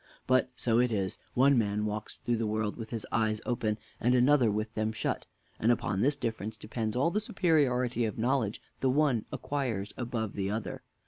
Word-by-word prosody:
But 130 Hz, 0 st, +3 dB
so 115 Hz, -2 st, +2 dB
it 125 Hz, -1 st, +3 dB
is 95 Hz, -3 st, -1 dB, 0.2 s
one 135 Hz, 0 st, +5 dB
man 105 Hz, -1 st, 0 dB
walks 105 Hz, 0 st, -4 dB
through 120 Hz, -1 st, -1 dB
the 110 Hz, -1 st, -1 dB
world 110 Hz, 0 st, -1 dB
with 110 Hz, -2 st, -7 dB
his 115 Hz, -3 st, -3 dB
eyes 110 Hz, -2 st, +1 dB
open, 110 Hz, -3 st, 0 dB, 0.2 s
and 125 Hz, +2 st, +3 dB
another 125 Hz, -1 st, +5 dB
with 110 Hz, +2 st, -2 dB
them 110 Hz, 0 st, 0 dB
shut; 110 Hz, -, -2 dB, 0.3 s
and 115 Hz, -, +4 dB
upon 100 Hz, -4 st, 0 dB
this 145 Hz, +4 st, +3 dB
difference 110 Hz, -4 st, -3 dB
depends 110 Hz, +1 st, -3 dB
all 140 Hz, +7 st, +2 dB
the 210 Hz, -, 0 dB
superiority 130 Hz, -, +2 dB
of 110 Hz, -, -3 dB
knowledge 115 Hz, -2 st, 0 dB, 0.2 s
the 130 Hz, -, +2 dB
one 135 Hz, -5 st, +2 dB
acquires 115 Hz, -9 st, -2 dB
above 115 Hz, -4 st, -3 dB
the 95 Hz, -1 st, -2 dB
other. 110 Hz, +1 st, -3 dB
115 Hz, 190 wpm, -30 LUFS, 110-125 Hz, 0.3 s, one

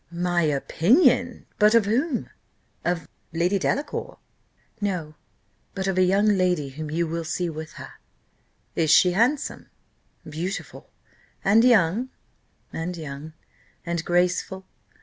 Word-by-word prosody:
"My 175 Hz, 0 st, 0 dB
opinion! 240 Hz, -, +2 dB
but 210 Hz, +1 st, +5 dB
of 230 Hz, -3 st, +5 dB
whom? 250 Hz, +6 st, -1 dB, 0.5 s
Of 175 Hz, -1 st, -1 dB, 0.3 s
Lady 175 Hz, +4 st, +1 dB
Delacour?" 285 Hz, +9 st, -2 dB, 0.6 s
"No; 180 Hz, -7 st, -2 dB, 0.6 s
but 190 Hz, -1 st, -2 dB
of 195 Hz, -1 st, 0 dB
a 185 Hz, -, +3 dB
young 195 Hz, +3 st, +3 dB
lady 180 Hz, -8 st, +2 dB
whom 155 Hz, +3 st, -7 dB
you 170 Hz, +3 st, 0 dB
will 165 Hz, +1 st, -3 dB
see 170 Hz, +1 st, -2 dB
with 155 Hz, 0 st, -8 dB
her." -, -, -11 dB, 0.8 s
"Is 160 Hz, -2 st, +1 dB
she 180 Hz, +3 st, +6 dB
handsome?" 245 Hz, +10 st, 0 dB, 0.6 s
"Beautiful!" 165 Hz, +6 st, -6 dB, 0.6 s
"And 215 Hz, +4 st, +5 dB
young?" 230 Hz, 0 st, +3 dB, 0.6 s
"And 175 Hz, +2 st, -4 dB
young." 150 Hz, 0 st, -8 dB, 0.5 s
"And 170 Hz, -1 st, -2 dB
graceful?" 180 Hz, +2 st, 0 dB
180 Hz, 120 wpm, -24 LUFS, 165-210 Hz, 0.8 s, she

